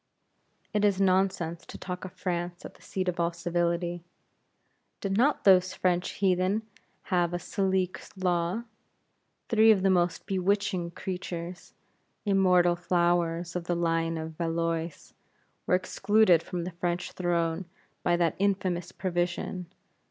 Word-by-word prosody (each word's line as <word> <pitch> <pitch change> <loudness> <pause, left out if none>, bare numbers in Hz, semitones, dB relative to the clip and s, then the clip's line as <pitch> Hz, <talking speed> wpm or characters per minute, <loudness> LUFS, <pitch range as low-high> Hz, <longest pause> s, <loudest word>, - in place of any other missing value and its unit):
It 210 0 +1
is 200 -2 +3
nonsense 185 -3 +1
to - - -8
talk 180 -1 -6
of 185 - -8
France 175 -1 -3
as - - -8
the - - -22
seat 185 -1 -3
of 175 -1 -1
all 170 0 +2
civility. 175 0 -1 1.0
Did 195 -1 -2
not 270 +7 +2
those 185 -1 +5
French 180 -1 0
heathen 190 +2 +1 0.5
have 175 -1 +2
a - - +1
Salique 190 0 -1 0.2
law? 180 +3 0 0.9
Three 225 0 +5
of 200 -4 +5
the 195 - +4
most 175 -1 +1
bewitching 195 -2 0
creatures, 180 0 -6 0.5
immortal 180 -3 +4
flowers 175 -1 0
of 175 -1 -3
the 175 - 0
line 165 -1 0
of 160 0 -6
Valois 165 -1 -2 0.6
were - - +4
excluded 195 -1 +3
from 175 0 -4
the 180 - -4
French 175 +1 -2
throne 170 0 -1 0.4
by 175 0 +2
that 170 -1 +1
infamous 185 -3 0
provision. 175 0 -2
180 Hz, 135 wpm, -28 LUFS, 170-190 Hz, 1.0 s, those